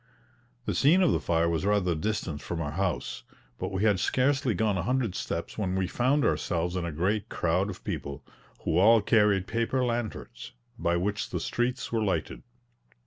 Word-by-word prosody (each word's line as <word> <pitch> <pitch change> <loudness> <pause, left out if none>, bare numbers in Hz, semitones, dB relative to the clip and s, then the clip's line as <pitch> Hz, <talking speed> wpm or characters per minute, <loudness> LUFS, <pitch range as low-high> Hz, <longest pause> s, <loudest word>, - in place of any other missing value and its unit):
The - - -1
scene 175 +7 +4
of 175 - +4
the - - +2
fire 85 0 +1
was 85 0 0
rather 100 -3 +2
distant 80 -3 -2
from 85 - -4
our 75 -3 -2
house, 95 0 -2 0.4
but - - -3
we 95 +1 -1
had 105 -4 +3
scarcely 130 +2 +1
gone 105 +2 +1
a 95 - 0
hundred 120 0 0
steps - - -4
when 95 -3 -1
we 95 0 +1
found 130 +9 +1
ourselves 85 0 0
in 90 -2 -1
a 85 - -3
great 95 +7 -1
crowd - - 0
of - - -8
people, 70 0 -5 0.4
who 80 - +2
all 110 +4 +7
carried 105 -3 +3
paper 115 +4 0
lanterns, 120 -1 -4 0.3
{330a} - - -10
by 85 0 +2
which 100 +3 -2
the - - -2
streets 120 +1 -2
were 115 -1 +1
lighted. 100 -3 -1
100 Hz, 190 wpm, -28 LUFS, 85-115 Hz, 0.4 s, all